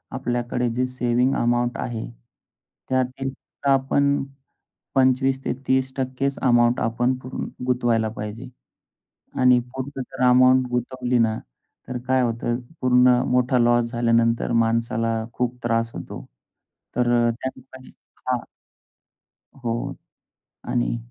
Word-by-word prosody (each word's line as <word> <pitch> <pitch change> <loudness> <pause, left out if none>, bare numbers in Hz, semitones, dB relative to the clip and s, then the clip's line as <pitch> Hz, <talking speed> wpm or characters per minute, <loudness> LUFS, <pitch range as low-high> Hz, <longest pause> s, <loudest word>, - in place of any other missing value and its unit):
आपल्याकडे 120 -1 -1
जे 125 +2 0
saving 125 +1 +1
amount 120 0 +1
आहे, 115 -2 -3 0.8
त्यातील 130 +1 -1
तर 140 - -6
आपण 140 +1 +2 0.7
25% 130 0 +2
ते - - -21
30%च 130 +1 0
अमाउंट 120 -1 +4
आपण 120 +3 +1
पूर 130 0 -9 0.3
गुंतवायला 120 -3 +1
पाहिजे. 110 +3 -7 0.9
आणि 125 -1 +6
पूर्ण 135 +1 -5
जर 130 - -4
अमाउंट 130 +1 +5
गुंतवली 125 0 -1
ना, 110 -1 +2 0.5
तर 125 - -4
काय 130 0 +3
होतं 120 0 -1 0.2
पूर्ण 125 0 +5
मोठा 125 0 +2
लॉस 120 0 +3
झाल्यानंतर 115 -1 +2
माणसाला 115 0 +1 0.2
खूप 125 +1 -2
त्रास 115 -1 0
होतो. - - -7 0.7
तर 120 0 +2 0.2
त्याठिकाणी 130 +2 -8 0.4
हां. 125 -1 +1 1.2
हो. 120 -3 -3 0.7
आणि - - 0
125 Hz, 110 wpm, -23 LUFS, 120-130 Hz, 1.2 s, आणि